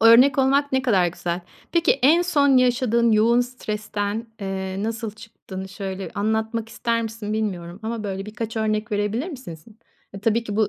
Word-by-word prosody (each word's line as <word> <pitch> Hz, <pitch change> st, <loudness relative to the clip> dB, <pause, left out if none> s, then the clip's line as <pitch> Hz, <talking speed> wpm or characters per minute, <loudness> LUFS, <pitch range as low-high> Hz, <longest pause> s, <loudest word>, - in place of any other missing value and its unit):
Örnek 245 Hz, +4 st, +7 dB
olmak 275 Hz, +2 st, +3 dB
ne 265 Hz, 0 st, +2 dB
kadar 195 Hz, -9 st, +3 dB
güzel. 170 Hz, +1 st, -3 dB, 0.3 s
Peki 335 Hz, -1 st, +4 dB
en 320 Hz, +6 st, +6 dB
son 285 Hz, -6 st, +4 dB
yaşadığın 240 Hz, -2 st, +3 dB
yoğun 230 Hz, +3 st, +4 dB
stresten, 215 Hz, -2 st, -3 dB
eee, 190 Hz, 0 st, -3 dB
nasıl 225 Hz, 0 st, -3 dB
çıktığını 205 Hz, -3 st, -9 dB
şöyle 190 Hz, -1 st, -5 dB
anlatmak 220 Hz, +2 st, -1 dB
ister 230 Hz, +1 st, -1 dB
misin 220 Hz, -1 st, -5 dB
bilmiyorum 190 Hz, -4 st, -3 dB
ama 225 Hz, -1 st, -3 dB
böyle 195 Hz, 0 st, -4 dB
birkaç 225 Hz, +1 st, -5 dB
örnek 215 Hz, 0 st, -1 dB
verebilir 210 Hz, -, 0 dB
misin 255 Hz, -, -7 dB
sin? 210 Hz, +8 st, -17 dB, 0.4 s
Eee, 195 Hz, -, -7 dB
tabii 225 Hz, +1 st, +1 dB
ki 205 Hz, -2 st, -4 dB
bu 215 Hz, -2 st, +3 dB
220 Hz, 170 wpm, -23 LUFS, 205-240 Hz, 0.4 s, Örnek